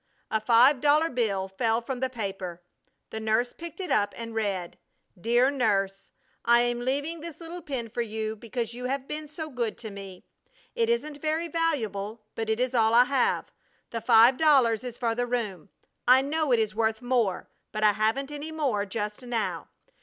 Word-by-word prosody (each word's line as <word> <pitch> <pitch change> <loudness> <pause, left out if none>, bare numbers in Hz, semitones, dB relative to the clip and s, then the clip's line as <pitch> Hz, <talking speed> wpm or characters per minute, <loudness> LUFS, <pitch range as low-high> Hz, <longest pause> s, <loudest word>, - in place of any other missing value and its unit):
A 220 - +1
five 245 +4 +5
dollar 300 +2 +4
bill 200 -6 0
fell 225 +4 0
from 245 +2 -5
the 260 0 0
paper. 195 -7 -5 0.5
The 220 - -4
nurse 220 +3 +1
picked 335 0 -9
it 370 - -4
up 205 -1 +2
and 230 -1 -6
read: 200 -5 -2 0.4
DEAR 240 +8 +3
NURSE, 195 -7 0 0.3
I 235 0 +5
am 240 0 0
leaving 285 +7 -2
this 325 -1 -8
little 340 +1 -7
pin 265 -7 -4
for 235 +2 -3
you 220 -1 -3
because 230 +1 -4
you 250 +1 -6
have 270 +1 -2
been 305 0 -5
so 310 +1 -6
good 235 -4 -2
to 220 -3 -7
me. 195 -2 -10 0.5
It 465 -1 +1
isn't 305 -11 -1
very 315 +2 0
valuable, 225 - -2
but 225 -1 -4
it 220 +1 +1
is 255 0 0
all 225 -1 +3
I 245 - +8
have. 255 0 0 0.4
The 230 - -3
five 235 +4 +6
dollars 260 -8 +4
is 245 -2 -6
for 230 -2 0
the 245 +1 -1
room. 210 -7 -3 0.4
I 255 +2 +7
know 305 0 0
it 240 - +5
is 215 -1 0
worth 220 +2 0
more, 240 -7 0 0.2
but 215 0 -3
I 210 - +7
haven't 220 +7 0
any 295 +2 -5
more 260 -10 -1
just 210 +3 -4
now. 240 -3 -2
240 Hz, 190 wpm, -27 LUFS, 215-275 Hz, 0.5 s, I